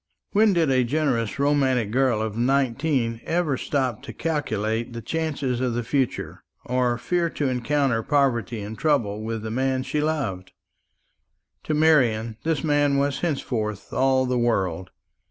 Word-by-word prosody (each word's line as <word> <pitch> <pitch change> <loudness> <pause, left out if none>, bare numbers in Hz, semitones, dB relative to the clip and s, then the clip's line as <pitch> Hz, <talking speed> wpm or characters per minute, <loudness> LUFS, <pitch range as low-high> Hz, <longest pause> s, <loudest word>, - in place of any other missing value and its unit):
When 210 0 +4
did 165 -5 +2
a 130 -1 +3
generous 125 -4 0
romantic 135 -6 +2
girl 125 -3 +2
of 110 -2 -4
nineteen 130 -1 0
ever 165 -4 0
stop 130 -5 -1
to - - -9
calculate 115 -7 -2
the 115 - -5
chances 145 -3 -2
of 125 -2 0
the 120 - -1
future, 130 +1 -2 0.2
or 125 -1 +1
fear 170 +6 0
to 145 -3 -2
encounter 130 -1 +1
poverty 120 -4 +1
and 105 +2 -6
trouble 115 -8 0
with 110 0 -4
the 110 - -4
man 130 +2 0
she 145 +3 -1
loved? 135 - -2 1.1
To 155 - 0
Marian 120 -8 +3
this 160 -3 0
man 145 -2 +2
was 140 0 0
henceforth 115 - -3
all 130 0 +3
the 125 -1 0
world. 95 -7 0
130 Hz, 150 wpm, -24 LUFS, 115-145 Hz, 1.1 s, When